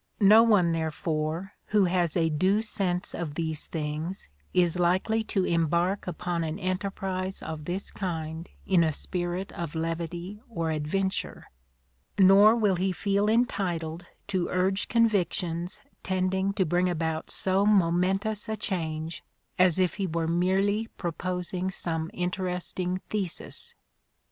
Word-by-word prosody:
No 215 +2 +8
one, 205 -7 +4
therefore, 160 +2 -2
who 205 -2 +4
has 175 -2 +1
a 165 -1 +2
due 190 +8 +2
sense 185 -4 -2
of 160 -4 -4
these 160 -2 -3
things 155 - -4 0.2
is 180 -1 +2
likely 185 +6 +2
to 190 -3 0
embark 170 +4 +1
upon 175 0 -2
an 160 +1 -3
enterprise 190 0 -3
of 155 -2 -6
this 185 +4 -4
kind 165 -3 -4 0.2
in 185 -3 +4
a 160 -2 +1
spirit 180 +4 -3
of 170 -2 -5
levity 170 +4 -3
or 165 -7 -2
adventure; 175 +6 -2 0.7
nor 200 +3 +7
will 205 -5 +2
he 190 +2 +1
feel 200 +2 +1
entitled 175 -8 0 0.2
to 185 -3 0
urge 190 +2 +1
convictions 185 -6 +1 0.2
tending 190 +1 0
to 195 -2 +1
bring 175 +2 +2
about 160 -2 -2
so 190 +1 +1
momentous 195 +2 +2
a 220 - -1
change 165 -5 -3 0.4
as 185 -2 +5
if 185 -2 +2
he 195 -2 -1
were 165 -1 -1
merely 195 +5 +1
proposing 180 +1 -3
some 165 -3 -3
interesting 180 0 -2
thesis. 195 -5 -4
180 Hz, 130 wpm, -28 LUFS, 165-195 Hz, 0.7 s, No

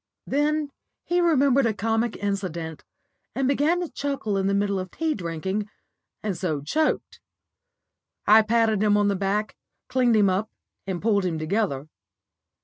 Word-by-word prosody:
Then 295 +1 0 0.3
he 350 0 +1
remembered 275 -6 +4
a 220 - -1
comic 225 +3 0
incident, 175 -6 -3 0.5
and 270 -1 +1
began 295 +6 +2
to 350 - -2
chuckle 275 -8 -2
in 195 0 +1
the 200 - +1
middle 200 -1 +1
of 185 0 -5
tea 320 - -1
drinking, 190 - -3 0.5
and 205 -3 -1
so 165 -4 -2
choked. 305 - -1 1.1
I 215 +1 +7
patted 220 -1 +2
him 210 -1 +4
on 205 0 +3
the 200 - +1
back, 200 +2 -1 0.3
cleaned 250 -2 +3
him 210 -2 +5
up, 195 +4 0 0.4
and 185 -2 -3
pulled 205 -3 +2
him 175 -3 -1
together. 155 -4 -1
210 Hz, 150 wpm, -25 LUFS, 190-260 Hz, 1.1 s, I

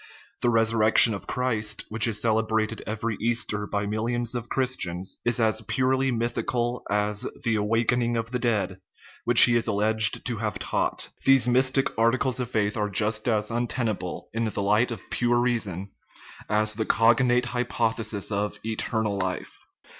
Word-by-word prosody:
The 120 - +2
resurrection 115 0 +5
of 100 - -7
Christ, 110 -5 -2
which 110 +1 +2
is 110 -2 -3
celebrated 110 0 0
every 110 0 -3
Easter 110 -3 0
by 100 0 -2
millions 115 +3 -2
of 120 -1 -5
Chris 130 -1 0
tians, 90 -1 -4
is 120 +1 +1
as 110 -1 +1
purely 130 +4 0
mythical 120 0 -1
as 105 0 -1
" - - -19
the 115 - +1
awakening 115 +3 +1
of 115 0 -3
the 125 - -1
dead," 100 -6 -1 0.5
which - - +6
he 120 - +5
is 115 -1 0
alleged 110 +1 +1
to 120 -3 -2
have 105 -2 -3
taught. 95 - -2
These 135 -3 +4
mystic 130 +2 +2
articles 130 +2 +1
of 125 -2 -3
faith 105 -3 0
are 105 -1 -1
just 105 +2 0
as 105 -2 0
untenable 115 -6 -3
in 115 0 -1
the 105 -2 -2
light 105 +5 +2
of 115 - -7
pure 120 0 +1
reason 105 -6 -1 0.6
as 105 0 +1
the 110 0 -2
cognate 120 +2 +3
hypothesis 115 -4 -2
of 105 +1 -2
" - - -15
eternal 110 -2 -1
life." 95 -1 -5
115 Hz, 165 wpm, -25 LUFS, 105-120 Hz, 0.6 s, which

